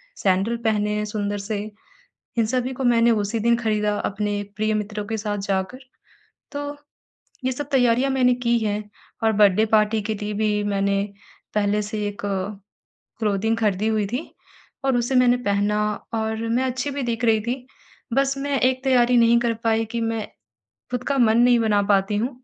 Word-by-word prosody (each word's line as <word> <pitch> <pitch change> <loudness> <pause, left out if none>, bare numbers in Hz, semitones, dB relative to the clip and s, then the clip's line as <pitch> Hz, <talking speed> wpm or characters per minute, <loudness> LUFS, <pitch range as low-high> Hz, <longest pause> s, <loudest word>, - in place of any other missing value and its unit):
Sandal 195 +5 +1
पहने 210 -1 +1
सुंदर 205 -1 -2
से 205 +1 -3 0.8
इन 230 - +3
सभी 255 +2 -1
को 265 - -5
मैंने 235 -1 +4
उसी 210 0 0
दिन 235 +2 +3
खरीदा 210 -2 0
अपने 205 0 -2 0.2
प्रिय 215 0 +1
मित्रों 210 0 -3
के 220 0 -2
साथ 205 -1 -3
जाकर, 195 +4 -2 0.7
तो 290 0 -4 0.7
ये 260 - +1
सब 285 +3 -5
तैयारियाँ 250 0 +3
मैंने 255 -2 +3
की 240 -1 +1
हैं। 210 -1 -1 0.4
और 220 - +4
बर्थडे 210 0 +4
पार्टी 215 0 +2
के 220 +1 -2
लिए 210 0 -2
भी 210 0 0
मैंने 200 -1 +1 0.5
पहले 210 0 +1
से 215 +1 -5
एक 205 - -8 1.0
क्लोथिंग 220 0 0
खरीदी 210 -2 +1
हुई 215 -2 +1
थी 245 +8 -3 0.6
और 265 -2 +2
उसे 240 +2 0
मैंने 250 -1 +5
पहना 205 +1 +1 0.3
और 220 0 -1
मैं 245 +3 +1
अच्छी 260 +2 -2
भी 280 0 -3
दिख 235 -1 -2
रही 220 -1 +4
थी, 245 +3 -4 0.5
बस 275 +1 +2
मैं 280 0 -1
एक 255 0 +2
तैयारी 250 -2 +4
नहीं 235 0 +5
कर 235 -1 +1
पाई 225 0 +2
कि 235 - -1
मैं 225 -1 -2 0.6
खुद 250 0 -3
का 275 - +1
मन 225 -2 +4
नहीं 245 0 +5
बना 210 -2 +2
पाती 195 +1 +2
हूँ 235 +5 0
220 Hz, 175 wpm, -23 LUFS, 210-245 Hz, 1.0 s, मैंने